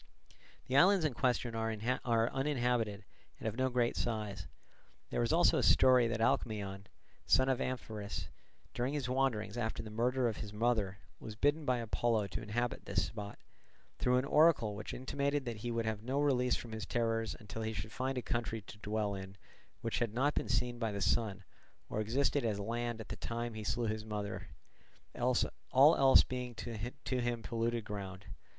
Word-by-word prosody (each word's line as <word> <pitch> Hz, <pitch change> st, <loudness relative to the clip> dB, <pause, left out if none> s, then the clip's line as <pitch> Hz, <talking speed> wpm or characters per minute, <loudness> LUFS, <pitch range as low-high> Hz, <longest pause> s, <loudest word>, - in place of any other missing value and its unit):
The 130 Hz, -, -2 dB
islands 185 Hz, +1 st, +6 dB
in 150 Hz, -, +1 dB
question 120 Hz, -1 st, 0 dB
are 115 Hz, 0 st, -1 dB, 0.6 s
uninhabited 120 Hz, -7 st, 0 dB, 0.3 s
and -, -, -5 dB
of 110 Hz, -, -2 dB
no 130 Hz, +1 st, +1 dB
great 120 Hz, -1 st, +1 dB
size. 105 Hz, -6 st, -3 dB, 0.6 s
There -, -, 0 dB
is -, -, +1 dB
also -, -, +4 dB
a -, -, +2 dB
story 125 Hz, -2 st, +6 dB
that 115 Hz, 0 st, -2 dB
Alcmaeon, 100 Hz, -3 st, 0 dB, 0.4 s
son 130 Hz, -, +5 dB
of 130 Hz, -2 st, +1 dB
Amphiraus, 110 Hz, -5 st, -4 dB, 0.5 s
during 130 Hz, +4 st, -1 dB
his 140 Hz, -4 st, -2 dB
wanderings 120 Hz, -4 st, 0 dB
after 110 Hz, -2 st, -2 dB
the 110 Hz, -, -8 dB
murder 125 Hz, +3 st, +1 dB
of 110 Hz, -, -2 dB
his 105 Hz, -, -6 dB
mother 105 Hz, -3 st, +1 dB, 0.2 s
was 110 Hz, -2 st, -8 dB
bidden 145 Hz, +6 st, +1 dB
by 125 Hz, -2 st, +2 dB
Apollo 115 Hz, -1 st, +1 dB
to -, -, -4 dB
inhabit 120 Hz, +3 st, -2 dB
this -, -, 0 dB
spot, 105 Hz, -2 st, -7 dB, 0.6 s
through 125 Hz, 0 st, +3 dB
an 130 Hz, -, +1 dB
oracle 145 Hz, -7 st, +4 dB
which 105 Hz, -, -6 dB
intimated 140 Hz, +2 st, -1 dB
that 120 Hz, -2 st, -4 dB
he 120 Hz, +3 st, -4 dB
would 115 Hz, -1 st, -1 dB
have 110 Hz, -1 st, -2 dB
no 130 Hz, +5 st, -1 dB
release 130 Hz, -4 st, +2 dB
from 115 Hz, -, -7 dB
his 110 Hz, -1 st, -5 dB
terrors 115 Hz, -1 st, 0 dB
until 110 Hz, 0 st, -7 dB
he 110 Hz, 0 st, -2 dB
should 110 Hz, 0 st, -5 dB
find 130 Hz, +2 st, -2 dB
a 125 Hz, -, -2 dB
country 115 Hz, -2 st, -2 dB
to 105 Hz, -, -12 dB
dwell 105 Hz, -1 st, -1 dB
in 95 Hz, 0 st, -7 dB, 0.4 s
which 115 Hz, -, -1 dB
had 115 Hz, -2 st, -1 dB
not 145 Hz, +4 st, +2 dB
been -, -, -2 dB
seen 120 Hz, +1 st, 0 dB
by 115 Hz, -2 st, 0 dB
the 100 Hz, -, -3 dB
sun, 100 Hz, -1 st, 0 dB, 0.5 s
or 110 Hz, -, -1 dB
existed 135 Hz, +5 st, +1 dB
as 105 Hz, -3 st, 0 dB
land 120 Hz, +2 st, -2 dB
at 110 Hz, -, -8 dB
the -, -, -4 dB
time 120 Hz, 0 st, -4 dB
he 110 Hz, -1 st, -6 dB
slew 120 Hz, +3 st, -1 dB
his 110 Hz, 0 st, -2 dB
mother; 105 Hz, -2 st, -4 dB, 0.7 s
all 130 Hz, +4 st, +3 dB
else 135 Hz, -1 st, +7 dB
being 125 Hz, -1 st, -5 dB
to 115 Hz, +1 st, -5 dB, 0.5 s
him 120 Hz, -1 st, -1 dB
polluted 115 Hz, -1 st, -1 dB
ground. 100 Hz, -2 st, -6 dB
115 Hz, 185 wpm, -34 LUFS, 110-125 Hz, 0.7 s, else